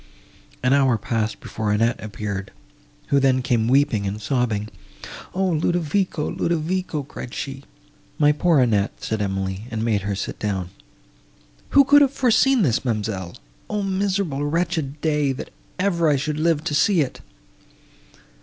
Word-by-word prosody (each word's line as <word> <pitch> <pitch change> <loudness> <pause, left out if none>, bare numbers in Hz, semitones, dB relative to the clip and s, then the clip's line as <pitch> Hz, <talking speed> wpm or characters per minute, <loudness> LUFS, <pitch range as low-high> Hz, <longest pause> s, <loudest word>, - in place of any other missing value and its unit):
An 130 +1 +3
hour 135 -4 +4
passed 110 -1 -2
before 110 -1 -3
Annette 115 +3 +1
appeared, 100 -2 -5 0.6
who 140 - +4
then 130 -2 +2
came 120 -3 +1
weeping 130 -6 +2
and 100 +2 -4
sobbing. 110 -2 -1 0.7
"O 190 +1 +1
Ludovico—Ludovico!" 170 -1 -1
cried 130 -2 -8
she. 135 -1 -5 0.5
"My 150 -1 +5
poor 155 +1 +3
Annette!" 110 -5 +2
said 110 -1 -3
Emily, 95 0 -2
and 110 -1 -2
made 105 -3 +1
her 100 +1 -2
sit 95 - -5
down. 95 -4 -2 1.1
"Who 280 - +10
could 290 +2 +6
have 280 - +5
foreseen 260 -1 +3
this, 125 -9 +1
ma'amselle? 105 -7 -3 0.3
O 210 -1 -1
miserable, 190 -6 -1
wretched, 160 -2 -1
day—that 150 -3 -1 0.3
ever 175 -4 +2
I 145 - +4
should 150 +2 -2
live 160 -1 +1
to 165 -3 -2
see 170 +4 +3
it!" 135 - -3
140 Hz, 140 wpm, -22 LUFS, 110-170 Hz, 1.1 s, Who